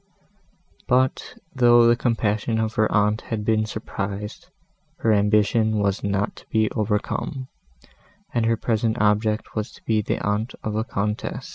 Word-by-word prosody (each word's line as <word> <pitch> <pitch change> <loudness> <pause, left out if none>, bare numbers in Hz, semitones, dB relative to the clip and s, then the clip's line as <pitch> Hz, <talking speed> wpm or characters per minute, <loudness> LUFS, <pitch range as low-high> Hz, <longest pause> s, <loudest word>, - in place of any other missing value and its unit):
But, 130 - +1 0.2
though 120 -2 +6
the 120 0 +5
compassion 115 -2 0
of 110 0 -1
her 110 -1 +1
aunt 105 +1 +2
had 105 -2 -4
been 110 -1 +2
surprised, 105 -1 -5 0.5
her 115 - +1
ambition 105 +1 +2
was 100 0 0
not 100 0 -1
to - - -15
be 110 -1 +1
overcome, 110 +5 -2 0.8
and 115 -2 +1
her 115 0 +2
present 115 0 0
object 105 +1 +1
was 110 0 -3
to - - -17
be 110 -1 +2
the - - -2
aunt 105 +4 -1
of 110 -1 -3
a 110 - 0
Countess. 105 -1 -3
110 Hz, 150 wpm, -23 LUFS, 105-115 Hz, 0.8 s, though